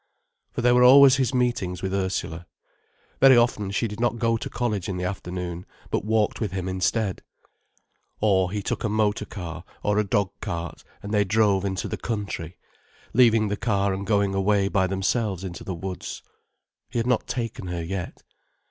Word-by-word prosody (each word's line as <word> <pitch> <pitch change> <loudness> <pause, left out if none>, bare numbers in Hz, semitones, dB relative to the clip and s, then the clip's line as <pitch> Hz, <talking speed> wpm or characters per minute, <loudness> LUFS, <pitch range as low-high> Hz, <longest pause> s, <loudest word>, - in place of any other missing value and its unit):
For - - -3
there 120 +1 +4
were 125 - +5
always 135 +1 +8
his 130 -2 +1
meetings 120 -9 -1
with 95 0 -2
Ursula. 90 -3 -2 0.7
Very 135 -2 +7
often, 115 -4 +2
she 105 +4 0
did 105 +1 -8
not 120 -1 +1
go 115 0 +1
to 115 - -4
college 105 -7 -2
in 95 - -3
the 90 - -3
afternoon, 90 -1 -4 0.3
but - - 0
walked 110 +1 0
with 105 -5 -2
him 95 -1 -3
instead. 95 +2 -1 1.0
Or 95 -4 +2
he 105 0 -3
took - - -3
a 110 - 0
motor 105 0 +1
car 85 -4 -7 0.2
or 105 0 +2
a - - +3
dog 100 -1 0
cart 85 0 -5 0.2
and 100 +1 -5
they 105 -1 +4
drove 100 -1 +2
into 95 -1 -2
the - - -4
country, 100 -7 -4 0.6
leaving 115 -3 +5
the 105 - 0
car 100 -3 +1
and 95 +1 -5
going 100 -2 +2
away 100 0 +2
by 95 -2 +2
themselves 95 0 -1
into 90 -2 -6
the 95 - -4
woods. 95 +2 -6 0.7
He - - -4
had 115 - +1
not 125 -2 +1
taken 115 -6 -4
her 85 -1 -3
yet. 90 +1 -5
100 Hz, 185 wpm, -25 LUFS, 95-115 Hz, 1.0 s, always